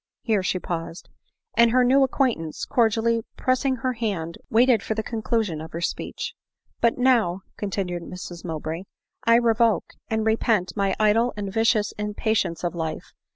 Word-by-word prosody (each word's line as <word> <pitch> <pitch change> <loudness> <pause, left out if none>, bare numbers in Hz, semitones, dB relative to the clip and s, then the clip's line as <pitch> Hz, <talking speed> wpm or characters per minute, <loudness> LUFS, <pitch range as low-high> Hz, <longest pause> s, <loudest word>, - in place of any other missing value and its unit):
Here 215 -4 +2
she 185 - 0
paused 170 -1 -5 0.2
:— 455 - -61
and 235 0 +6
her 250 +2 +4
new 265 +3 +5
acquaintance, 250 - 0
cordially 230 0 +2 0.2
pressing 260 +1 +1
her 255 +1 -2
hand, 195 -8 -3
waited 235 -1 +4
for 220 - -3
the 220 - -2
conclusion 220 -7 -1
of 160 - -9
her 165 - -3
speech; - - -3 0.2
" - - -45
but 235 0 +3
now," 235 -8 +3
continued 190 -4 -3
Mrs 175 0 -8
Mowbray, 160 +3 -4 0.2
" - - -29
1 230 +1 +6
revoke, 230 -1 +2 0.2
and 220 0 0
repent 220 -5 +1
my 200 -2 +1
idle 220 +3 +3
and 200 -2 -4
vicious 225 -1 +2
impatience 210 -4 -1
of 175 - -1
life. 160 -2 -5
220 Hz, 165 wpm, -24 LUFS, 180-235 Hz, 0.2 s, and